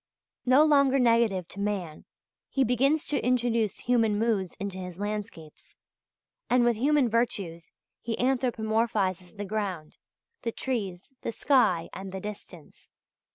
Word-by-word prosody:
No 260 +4 +6
longer 280 -3 +4
negative 230 -7 +3
to 200 - -9
man, 195 -6 -3 0.4
he 270 - +2
begins 275 +6 +2
to 295 - -1
introduce 235 -4 +1
human 230 -4 +2
moods 210 -5 0
into 195 -1 -4
his 180 -2 -7
landscapes, 205 -6 -6 0.7
and 250 0 +4
with 240 -1 +3
human 280 +3 +3
virtues 200 -8 -2 0.3
he 225 -1 -3
anthropomorphizes 220 -7 0
the 205 - -4
ground, 190 -6 -4 0.4
the 230 - -2
trees, 210 -4 -4
the - - -3
sky, 230 - +2
and 190 0 -7
the 190 - -5
distance. 195 -5 -10
220 Hz, 130 wpm, -28 LUFS, 190-245 Hz, 0.7 s, No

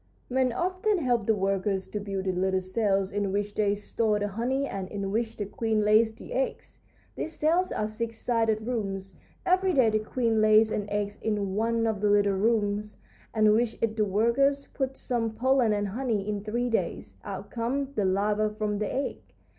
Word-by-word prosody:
"Men 260 0 +2
often 370 - 0
help 245 - 0
the 220 - +4
workers 195 0 0
to 210 - -3
build 195 -2 -4
the 190 - +1
little 190 +1 +1
cells 195 0 0
in 200 -1 -1
which 205 +1 -1
they 205 -1 +1
store 210 +1 0
the 205 0 -1
honey 250 +7 -1
and 195 -7 -4
in 200 -1 -3
which 225 +1 -1
the 205 - -2
queen 220 +1 0
lays 215 +2 +4
the 230 - -10
eggs. - - -3 0.4
These 320 - -4
cells 345 +4 +2
are 215 - -1
six 225 +1 -4
sided 225 -3 0
rooms. 195 -5 -3 0.3
Every 370 0 +3
day 250 -6 +4
the 215 - +2
queen 225 0 0
lays 215 0 +5
an 205 -1 -2
egg 205 0 -1
in 205 -3 -1
one 230 +2 +1
of 220 -3 -1
the 210 - +3
little 205 -1 +4
rooms, 210 0 0 0.3
and 215 -1 +4
with 230 +1 +1
it 220 -1 +1
the 215 -1 +2
workers 235 +8 +2
put 265 0 -2
some 230 -3 -2
pollen 255 -1 +3
and 205 -1 0
honey. 220 -2 -2
In 205 -1 -2
three 240 +3 -1
days 225 - -2
out - - -7
comes 260 +4 -1
the 210 - 0
larva 205 +3 +1
from 210 -1 -2
the 210 - -2
egg. 275 - -2
215 Hz, 195 wpm, -27 LUFS, 205-235 Hz, 0.4 s, lays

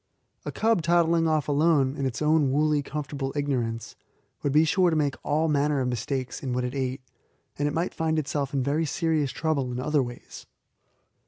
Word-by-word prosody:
A - - -3
cub 225 -4 +2
toddling 165 0 +3
off 155 -2 +1
alone 145 -2 +2
in 140 -3 -1
its 130 +4 -3
own 150 -3 +3
woolly, 150 +1 +2
comfortable 140 -1 -4
ignorance 125 -6 -2 0.5
would 145 - 0
be 155 +3 +5
sure 180 +3 +3
to 160 - 0
make 145 -3 +1
all 155 +2 +1
manner 145 -1 +1
of 125 -1 0
mistakes 130 +2 -3
in 130 -3 -3
what 125 0 -1
it 125 0 -3
ate, 130 -1 -2 0.6
and 145 - +1
it - - -1
might 170 +3 -1
find 160 -1 0
itself 145 -2 -2
in 135 -2 0
very 150 +4 0
serious 155 -1 0
trouble 140 -2 -1
in 125 - -4
other 150 +2 +1
ways. 120 -1 -8
145 Hz, 190 wpm, -26 LUFS, 135-160 Hz, 0.6 s, be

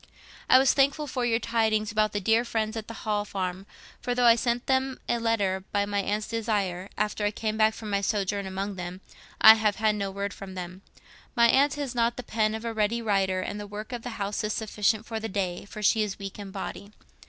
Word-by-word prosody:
"I - - +8
was 265 0 +5
thankful 280 +2 +2
for 255 -3 -2
your 225 -1 +2
tidings 220 -2 0
about 215 -1 +2
the 205 - -1
dear 225 +4 +3
friends 220 -2 -2
at 220 -1 -5
the 230 - -7
Hall 210 -1 +1
Farm, 190 -1 -4 0.3
for 245 -1 -1
though 245 0 +2
I 235 - +9
sent 240 +1 -1
them 265 0 0
a 235 - +1
letter, 200 -5 0
by 200 0 +1
my 205 0 -1
aunt's 210 +2 -1
desire, 205 -5 -2
after 210 0 -1
I 205 - +3
came 215 0 -3
back 220 0 +3
from 215 -2 -7
my 200 0 +1
sojourn 200 -1 -1
among 195 +1 -4
them, 180 +1 -6 0.4
I 220 - +11
have 215 -2 +1
had 215 0 +2
no 200 -2 -2
word 200 +1 -4
from 190 -1 -9
them. 180 +1 -7 0.5
My 235 0 +5
aunt 280 +4 +4
has 285 -4 -4
not 235 -1 +1
the 250 - -5
pen 215 -1 0
of 220 +1 -6
a 230 - -2
ready 220 +2 +1
writer, 195 -4 +1
and 205 +2 -4
the 205 - -6
work 210 +3 -7
of 240 - -4
the 235 -1 -6
house 200 +1 -2
is 215 0 -1
sufficient 215 0 0
for 225 -2 -4
the 225 0 -4
day, 185 -3 -2
for 210 +1 -8
she 220 +2 +4
is 210 -2 -2
weak 195 0 -7
in 200 -1 -7
body. 200 +1 -7
215 Hz, 235 wpm, -27 LUFS, 200-230 Hz, 0.5 s, I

